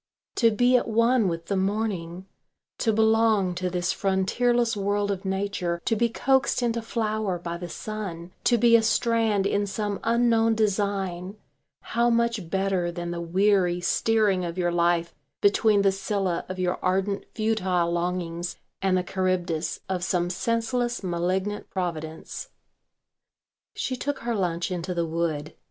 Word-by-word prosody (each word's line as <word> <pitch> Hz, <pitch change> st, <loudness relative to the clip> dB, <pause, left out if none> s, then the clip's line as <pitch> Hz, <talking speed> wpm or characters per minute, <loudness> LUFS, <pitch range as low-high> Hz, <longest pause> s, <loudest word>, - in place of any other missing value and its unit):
To 230 Hz, -, +5 dB
be 245 Hz, +4 st, +3 dB
at -, -, -1 dB
one 230 Hz, 0 st, +3 dB
with 165 Hz, -1 st, -3 dB
the 200 Hz, -, -1 dB
morning, 190 Hz, -3 st, -2 dB, 0.5 s
to 225 Hz, -, +2 dB
belong 220 Hz, -3 st, +3 dB
to 180 Hz, +1 st, -2 dB
this 180 Hz, 0 st, -1 dB
frontierless 230 Hz, +5 st, +1 dB
world 205 Hz, 0 st, 0 dB
of 195 Hz, 0 st, -4 dB
nature, 190 Hz, -3 st, -1 dB
to 225 Hz, -, +2 dB
be 235 Hz, +2 st, +2 dB
coaxed 265 Hz, +1 st, +1 dB
into 235 Hz, -1 st, 0 dB
flower 215 Hz, -4 st, -1 dB
by 170 Hz, 0 st, -5 dB
the 175 Hz, 0 st, -7 dB
sun, 185 Hz, -4 st, -6 dB
to 240 Hz, -, +4 dB
be 235 Hz, +1 st, +5 dB
a 230 Hz, -, +6 dB
strand 225 Hz, -3 st, +2 dB
in 205 Hz, 0 st, +1 dB
some 205 Hz, 0 st, -3 dB
unknown 230 Hz, -1 st, +3 dB
design, 200 Hz, -3 st, -1 dB, 0.4 s
how 235 Hz, +1 st, +1 dB
much 230 Hz, -6 st, 0 dB
better 190 Hz, -2 st, 0 dB
than 175 Hz, 0 st, -5 dB
the 170 Hz, 0 st, -4 dB
weary 180 Hz, 0 st, +2 dB
steering 205 Hz, +1 st, +2 dB
of 170 Hz, 0 st, -4 dB
your 175 Hz, -1 st, +1 dB
life 170 Hz, 0 st, +1 dB, 0.3 s
between 205 Hz, 0 st, +3 dB
the 195 Hz, -, +4 dB
Scylla 195 Hz, -2 st, -2 dB
of 185 Hz, -, -5 dB
your 180 Hz, -1 st, -1 dB
ardent 195 Hz, +2 st, 0 dB
futile 190 Hz, -6 st, +1 dB
longings 175 Hz, 0 st, -2 dB, 0.3 s
and 190 Hz, -1 st, +2 dB
the 180 Hz, -, 0 dB
Charybdis 180 Hz, -3 st, -1 dB
of 185 Hz, -2 st, -2 dB
some 175 Hz, 0 st, 0 dB
senseless 230 Hz, +3 st, -1 dB
malignant 185 Hz, +3 st, -2 dB
providence. 160 Hz, -4 st, -5 dB, 1.3 s
She 255 Hz, -, -2 dB
took 285 Hz, +3 st, -3 dB
her 235 Hz, 0 st, -1 dB
lunch 180 Hz, -3 st, -1 dB
into 180 Hz, 0 st, -3 dB
the 170 Hz, -1 st, 0 dB
wood. 160 Hz, -2 st, -2 dB
195 Hz, 150 wpm, -26 LUFS, 175-220 Hz, 1.3 s, a